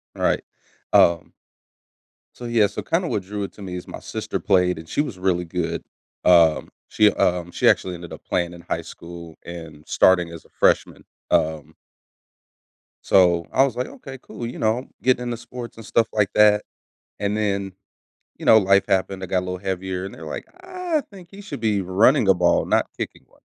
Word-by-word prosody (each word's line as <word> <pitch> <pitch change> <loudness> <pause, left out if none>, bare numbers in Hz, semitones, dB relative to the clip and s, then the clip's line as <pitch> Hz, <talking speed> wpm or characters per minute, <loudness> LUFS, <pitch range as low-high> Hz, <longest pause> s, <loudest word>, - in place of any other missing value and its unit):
Right. - - +1 0.5
Um 85 -1 +4 1.0
So, 120 - -9
yeah 115 -3 +3
so 100 - -6
kinda 170 +2 0
what 105 - -1
drew 100 +2 -5
it 100 - -6
to - - -14
me 90 -2 -6
is 90 - -7
my - - -8
sister - - -4
played 90 -2 +2
and 80 - -12
she - - +1
was 125 -11 -5
really 90 -2 0
good, 85 0 -3 0.4
um, 85 -3 +5 0.2
she 105 -1 +4
um, 90 -1 0
she - - +1
actually 90 - +1
ended 85 0 -10
up - - -11
playing 85 -1 -1
in 85 - -11
high 85 -1 -3
school 85 -1 -11
and 80 -3 -9
starting 90 -2 +4
as 85 - -10
a - - -22
freshman, - - +1 0.3
um 80 -2 0 1.3
So 90 -3 +4
I 135 - +4
was 130 - -3
like, 125 +1 -2
"Okay, 135 -1 -10
cool," 120 -1 -8
you 120 - -7
know? 115 +4 0
Getting 125 -1 +2
into 120 -1 -3
sports 120 +1 -9
and 115 - -11
stuff 115 +1 +2
like 105 -2 +1
that, 105 0 +5 0.6
and 100 0 -1
then, 100 -2 -1 0.7
you - - -9
know, 110 - +8
life 100 0 +3
happened, 95 0 0
I - - -2
got 90 0 0
a - - -3
little 90 0 -4
heavier, 95 0 -3
and 95 - -8
they're 80 - -11
like, 75 - -6 0.2
"I 365 -4 -2
think 185 -4 -13
he 200 - -11
should 205 - -7
be 105 -3 +1
running 105 +7 +3
a 95 - +6
ball, 90 -1 +2
not - - +2
kicking - - -6
one." - - -28
95 Hz, 195 wpm, -22 LUFS, 90-115 Hz, 1.3 s, know